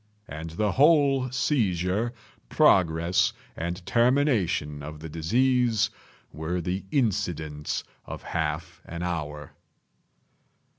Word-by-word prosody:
And 80 +3 -6
the 100 +6 0
whole 140 -3 +4
seizure, 110 - 0 0.4
progress 85 0 +3 0.2
and 85 +3 -4
termination 115 - +2
of 75 +1 -8
the 80 +1 -8
disease, 120 - +2 0.4
were 80 +3 -3
the 90 +3 -3
incidents 80 - -1 0.2
of - - -8
half 80 +2 -3
an 85 0 -6
hour. 75 -4 -4
90 Hz, 95 wpm, -26 LUFS, 80-120 Hz, 0.4 s, whole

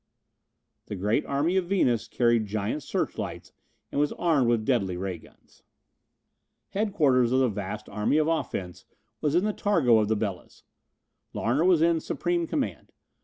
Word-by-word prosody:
The - - -5
great 105 +9 0
army 150 +7 +1
of 180 -2 0
Venus 125 - +1
carried 120 -3 +2
giant 105 +7 -2
searchlights - - -4 0.4
and 145 - 0
was 150 - +1
armed 155 -8 +2
with 115 -2 +1
deadly 100 -9 0
ray 95 -2 -4
guns. - - -22 1.1
Headquarters 145 - +2
of 130 - +3
the 130 -2 +3
vast 100 -2 -5
Army 105 +8 0
of 155 0 +2
Offense 95 - -3 0.4
was 150 +1 +1
in 180 - +3
the 215 - 0
targo 150 - +3
of 105 - +1
the 110 - +1
Belas. 100 -4 -5 0.7
Larner 130 +9 +1
was 175 -4 +4
in 165 -1 +3
supreme 175 +1 -1
command. 275 - -3
130 Hz, 155 wpm, -27 LUFS, 105-165 Hz, 1.1 s, was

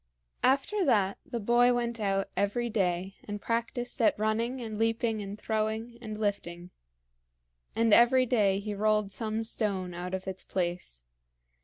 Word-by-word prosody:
After 280 +10 +2
that 205 - +2
the 245 -5 -4
boy 240 +3 +4
went 235 -1 -2
out 195 -2 0
every 230 +4 0
day 190 -2 -1
and 205 0 -5
practiced 235 +3 -2
at 225 - +4
running 225 +4 0
and 220 -3 -5
leaping 225 -1 +1
and 200 0 -6
throwing 220 +2 -2
and 215 -2 -6
lifting; 180 -4 -3 1.0
and 230 -2 +3
every 255 +3 +6
day 205 -5 +2
he 210 +1 -4
rolled 210 0 +1
some 220 +1 -2
stone 200 -5 -1
out 180 +2 -4
of 190 0 -7
its 190 0 -5
place. 175 - -2
215 Hz, 150 wpm, -29 LUFS, 195-235 Hz, 1.0 s, every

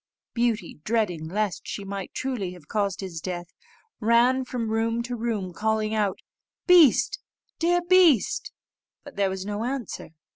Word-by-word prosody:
Beauty, 230 -9 -1
dreading 190 -8 0
lest 205 +2 -2
she 200 - -5
might 195 -1 -5
truly 230 -9 -3
have 170 -5 -15
caused 205 -2 -1
his 175 -4 -6
death, 175 -2 -5 0.5
ran 240 +3 +4
from 235 -3 -3
room 230 +1 0
to 245 +1 -4
room, 220 -6 -3
calling 220 +2 0
out, 205 -3 0 0.5
"Beast, 360 - +6 0.4
dear 350 +1 +2
beast;" 350 - +4 0.5
but 285 - -12
there 200 -1 +1
was 190 0 -4
no 205 +1 -3
answer. 250 -3 -4
220 Hz, 145 wpm, -25 LUFS, 195-245 Hz, 0.5 s, Beast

